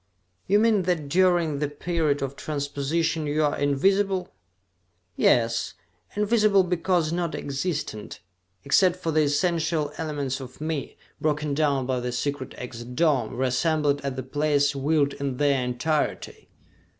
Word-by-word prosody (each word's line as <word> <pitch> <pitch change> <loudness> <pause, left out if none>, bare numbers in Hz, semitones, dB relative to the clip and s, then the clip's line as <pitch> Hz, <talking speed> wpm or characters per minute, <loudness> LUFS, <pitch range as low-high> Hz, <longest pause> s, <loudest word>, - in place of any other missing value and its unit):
"You 200 - +4
mean 220 -2 +3
that 155 -5 -1
during 175 -3 +2
the 150 - 0
period 150 -1 -1
of 135 0 -4
transposition 150 +2 -2
you 150 +1 +1
are 145 - +1
invisible?" 190 +7 +1 0.8
"Yes, 115 -1 +2 0.4
invisible 210 -2 +3
because 175 -2 0
non 170 -2 -1
existent, 140 - -4 0.5
except 185 -2 +4
for 180 -3 -3
the 155 0 +3
essential 155 0 0
elements 145 -4 -2
of 130 -2 -10
me, 155 -2 -4 0.2
broken 150 -1 0
down 140 -3 +1
by 130 -1 -1
the 125 0 -3
secret 135 +1 -3
exit 125 0 -8
dome, 130 -7 +1
reassembled 145 +3 +1
at 140 -2 -3
the 130 - -4
place 145 +1 +1
willed 140 0 +1
in 140 -3 -4
their 140 -2 +2
entirety! 125 +5 -2
150 Hz, 135 wpm, -25 LUFS, 140-170 Hz, 0.8 s, You